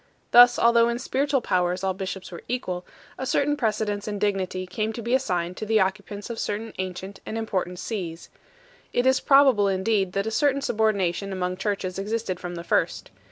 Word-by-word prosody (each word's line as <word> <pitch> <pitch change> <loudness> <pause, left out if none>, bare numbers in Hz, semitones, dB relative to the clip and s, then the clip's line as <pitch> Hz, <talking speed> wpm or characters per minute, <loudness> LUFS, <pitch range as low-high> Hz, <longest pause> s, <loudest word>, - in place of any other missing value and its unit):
Thus, 245 0 +8
although 235 0 +5
in 235 - -1
spiritual 270 +2 0
powers 180 -2 0
all 190 -1 +1
bishops 190 0 -6
were 170 - -8
equal, 185 -8 -3 0.4
a 260 - -2
certain 290 +3 +2
precedence 215 -5 -1
in 205 -1 -3
dignity 190 -2 -1
came 215 +4 -2
to 235 - -6
be 235 +2 -1
assigned 180 -9 0
to - - -4
the 220 0 +3
occupants 200 +3 -2
of 225 - -5
certain 215 +2 -3
ancient 185 +1 -5
and 220 - -5
important 185 -5 -2
sees. 175 -5 -5 0.6
It 245 - +1
is 260 0 +4
probable 270 -7 +5
indeed 195 0 +1
that 195 +1 0
a 220 - -2
certain 280 +4 +2
subordination 200 -5 0
among 185 -1 -2
churches 190 -2 -2
existed 205 -2 -2
from 175 0 -6
the 170 - -6
first. 170 -1 0
205 Hz, 185 wpm, -25 LUFS, 185-230 Hz, 0.6 s, Thus